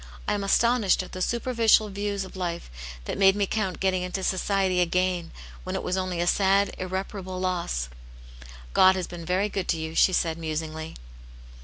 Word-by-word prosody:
I -, -, +2 dB
am 205 Hz, -1 st, -2 dB
astonished 225 Hz, -1 st, +3 dB
at -, -, -11 dB
the 185 Hz, -, -6 dB
superficial 230 Hz, -1 st, +3 dB
views 200 Hz, 0 st, -2 dB
of 190 Hz, -, -12 dB
life 170 Hz, -, -4 dB, 0.3 s
that -, -, -4 dB
made 195 Hz, 0 st, +6 dB
me 205 Hz, -1 st, +1 dB
count 195 Hz, -3 st, -2 dB
getting 190 Hz, -1 st, +1 dB
into 180 Hz, +1 st, -3 dB
society 190 Hz, -1 st, +1 dB
a -, -, +4 dB
gain 180 Hz, -1 st, 0 dB, 0.3 s
when -, -, -4 dB
it -, -, -3 dB
was 180 Hz, -, -1 dB
only 185 Hz, -2 st, -2 dB
^ 175 Hz, +1 st, 0 dB
sad, 195 Hz, +2 st, +3 dB
irreparable 185 Hz, 0 st, -4 dB
loss." 175 Hz, -, -1 dB, 0.9 s
'*God 190 Hz, 0 st, +6 dB
has 185 Hz, -2 st, -2 dB
been 170 Hz, -1 st, -8 dB
very 185 Hz, +3 st, +1 dB
good 195 Hz, -3 st, -3 dB
to -, -, +1 dB
you," 160 Hz, 0 st, -5 dB
she 185 Hz, -, +5 dB
said, 170 Hz, -2 st, 0 dB
musingly. 160 Hz, 0 st, -4 dB
185 Hz, 185 wpm, -26 LUFS, 175-195 Hz, 0.9 s, made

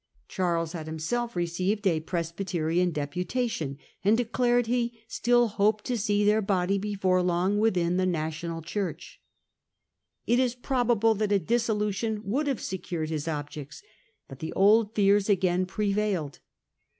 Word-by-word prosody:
Charles 170 Hz, -3 st, -1 dB
had 160 Hz, -3 st, -6 dB
himself 210 Hz, +10 st, -2 dB
received 180 Hz, +5 st, -1 dB
a 170 Hz, -5 st, +3 dB
Presbyterian 170 Hz, +1 st, -1 dB
deputation, 170 Hz, -, -2 dB, 0.3 s
and 210 Hz, +3 st, +4 dB
declared 245 Hz, 0 st, +1 dB
he 235 Hz, 0 st, -1 dB
still 240 Hz, +1 st, +3 dB
hoped 210 Hz, 0 st, +1 dB
to 250 Hz, -, -1 dB
see 205 Hz, -2 st, +1 dB
their 210 Hz, +1 st, +4 dB
body 195 Hz, -1 st, +1 dB
before 190 Hz, -3 st, +1 dB
long 180 Hz, +3 st, +1 dB
within 180 Hz, -5 st, +2 dB
the 185 Hz, 0 st, +2 dB
national 165 Hz, 0 st, -3 dB
Church. 190 Hz, +3 st, -5 dB, 1.0 s
It 240 Hz, +1 st, +3 dB
is 250 Hz, -2 st, +1 dB
probable 240 Hz, -4 st, +2 dB
that 210 Hz, -1 st, -1 dB
a 200 Hz, -, +5 dB
dissolution 215 Hz, +1 st, -1 dB
would 270 Hz, +10 st, 0 dB
have 270 Hz, -5 st, -1 dB
secured 170 Hz, -4 st, -4 dB
his 155 Hz, 0 st, -3 dB
objects. 145 Hz, -1 st, -5 dB, 0.4 s
But 135 Hz, -, -11 dB
the 160 Hz, -, -5 dB
old 210 Hz, +2 st, +4 dB
fears 200 Hz, 0 st, +3 dB
again 185 Hz, -2 st, +2 dB
prevailed. 200 Hz, -6 st, -1 dB
195 Hz, 140 wpm, -27 LUFS, 170-220 Hz, 1.0 s, a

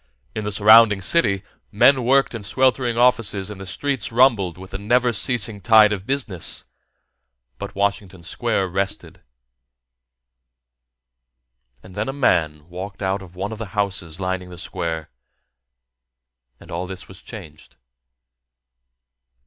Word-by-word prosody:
In 110 Hz, -, -4 dB
the 105 Hz, -, -2 dB
surrounding 105 Hz, 0 st, +6 dB
city, 100 Hz, -, +1 dB, 0.3 s
men 130 Hz, +5 st, +4 dB
worked 135 Hz, +2 st, +3 dB
in 115 Hz, -, -6 dB
sweltering 125 Hz, +2 st, +1 dB
offices 115 Hz, -5 st, +1 dB
and 100 Hz, -2 st, -9 dB
the 95 Hz, -, -8 dB
streets 135 Hz, +9 st, -2 dB
rumbled 115 Hz, -8 st, +3 dB
with 95 Hz, +1 st, -12 dB
the 95 Hz, -, -5 dB
never 120 Hz, +4 st, +1 dB
ceasing 115 Hz, -2 st, +1 dB
tide 110 Hz, -1 st, +5 dB
of 100 Hz, -1 st, -7 dB
business 120 Hz, -11 st, 0 dB, 0.9 s
but 100 Hz, +1 st, -7 dB
Washington 100 Hz, -2 st, -2 dB
Square 105 Hz, -1 st, -2 dB
rested. 95 Hz, +2 st, -4 dB, 2.6 s
And 95 Hz, -, -14 dB
then 105 Hz, +5 st, -3 dB
a -, -, -3 dB
man 80 Hz, -, 0 dB
walked 95 Hz, +3 st, -8 dB
out 95 Hz, +1 st, -1 dB
of 90 Hz, -2 st, -14 dB
one 100 Hz, +4 st, -4 dB
of 110 Hz, -, -7 dB
the 115 Hz, -, -5 dB
houses 90 Hz, -5 st, -2 dB
lining 95 Hz, -1 st, -3 dB
the 90 Hz, -, -11 dB
square, 80 Hz, -1 st, -5 dB, 1.5 s
and -, -, -15 dB
all 90 Hz, +2 st, -4 dB
this 95 Hz, 0 st, -9 dB
was 95 Hz, 0 st, -14 dB
changed. 85 Hz, -10 st, -12 dB
100 Hz, 135 wpm, -21 LUFS, 95-115 Hz, 2.6 s, surrounding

